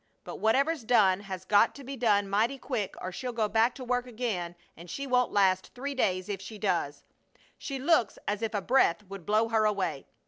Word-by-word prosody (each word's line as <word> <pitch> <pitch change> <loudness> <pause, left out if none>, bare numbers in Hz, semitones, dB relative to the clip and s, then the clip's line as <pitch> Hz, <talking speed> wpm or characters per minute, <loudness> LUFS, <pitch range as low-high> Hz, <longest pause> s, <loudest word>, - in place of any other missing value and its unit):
But - - -7
whatever's 275 +6 +1
done 200 -5 +4
has 190 -2 -7
got 210 +2 +4
to 280 - -10
be 275 +2 -6
done 210 -5 +2
mighty 220 +7 +1
quick 245 -7 -3
or 185 - -5
she'll 250 +6 -4
go 220 -2 0
back 225 +3 +2
to 260 - -8
work 250 0 -1
again, 215 -8 -3 0.2
and 170 +2 -12
she 275 +10 -4
won't 250 -2 +2
last 190 -2 +2
three 280 +3 -4
days 185 -8 0
if 200 -2 -4
she 215 +2 -9
does. 175 -8 -1 0.6
She 275 - -4
looks 265 -5 +2
as 205 +1 -1
if 225 -1 -2
a 205 - 0
breath 235 -6 +3
would 195 -3 -10
blow 215 +2 +2
her 220 -1 +2
away. 200 -9 -1
215 Hz, 210 wpm, -29 LUFS, 195-250 Hz, 0.6 s, done